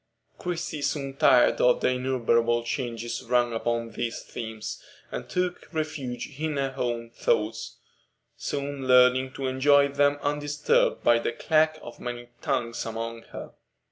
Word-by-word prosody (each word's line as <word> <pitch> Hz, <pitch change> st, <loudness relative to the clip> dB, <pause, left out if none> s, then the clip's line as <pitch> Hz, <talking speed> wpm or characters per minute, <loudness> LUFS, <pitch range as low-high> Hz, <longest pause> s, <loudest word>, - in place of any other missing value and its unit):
Christie 170 Hz, -4 st, -3 dB
soon 140 Hz, -1 st, -2 dB
tired 125 Hz, -2 st, +5 dB
of 125 Hz, -, +4 dB
the -, -, +3 dB
innumerable 120 Hz, -2 st, +1 dB
changes 120 Hz, -1 st, -3 dB
rung 120 Hz, 0 st, +2 dB
upon 115 Hz, 0 st, -1 dB
these 115 Hz, +1 st, -4 dB
themes, 110 Hz, -2 st, -6 dB, 0.3 s
and -, -, -5 dB
took 180 Hz, 0 st, -2 dB
refuge 150 Hz, -4 st, -4 dB
in 155 Hz, -2 st, -1 dB
her 135 Hz, -1 st, -1 dB
own 120 Hz, -3 st, -2 dB
thoughts, 110 Hz, -1 st, -1 dB, 0.6 s
soon 140 Hz, -1 st, -4 dB
learning 125 Hz, +1 st, +5 dB
to 135 Hz, -, -4 dB
enjoy 140 Hz, +2 st, +4 dB
them 145 Hz, +1 st, +2 dB
undisturbed 145 Hz, 0 st, +1 dB
by 120 Hz, 0 st, +5 dB
the 115 Hz, -, -1 dB
clack 155 Hz, 0 st, +2 dB
of -, -, -10 dB
many 120 Hz, 0 st, -6 dB
tongues 115 Hz, -1 st, -1 dB
about 115 Hz, 0 st, -5 dB
her. -, -, -8 dB
125 Hz, 140 wpm, -27 LUFS, 120-145 Hz, 0.6 s, tired